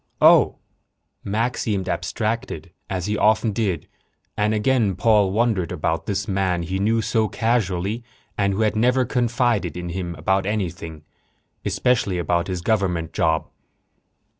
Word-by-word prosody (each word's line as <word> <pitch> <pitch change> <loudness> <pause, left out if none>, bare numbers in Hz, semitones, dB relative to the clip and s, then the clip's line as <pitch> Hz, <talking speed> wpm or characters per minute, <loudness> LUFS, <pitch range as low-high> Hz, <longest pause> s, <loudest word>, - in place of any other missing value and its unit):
"Oh." - - +6 0.7
Mac 115 +5 -1
seemed 100 -4 -1
abstracted, 110 +4 -3 0.2
as 95 -2 -2
he 105 +1 -1
often 110 0 +3
did, 100 -5 -1 0.5
and 105 +1 +1
again 110 -2 +2
Paul 105 -3 +3
wondered 105 -5 +1
about 80 +1 -2
this 100 0 -1
man 95 -3 0
he 95 +3 -3
knew 110 +3 +1
so 110 +1 +1
casually 110 -1 -1 0.3
and 100 -1 +1
who 100 - -1
had 110 -1 +2
never 125 +3 +3
confided 120 - 0
in 90 0 -5
him 85 -1 -4
about 95 +5 0
anything 85 -6 -3 0.6
especially 110 -7 +1
about 85 0 0
his 90 -2 -3
government 90 -6 0
job. 80 -1 +1
100 Hz, 140 wpm, -22 LUFS, 90-110 Hz, 0.7 s, Oh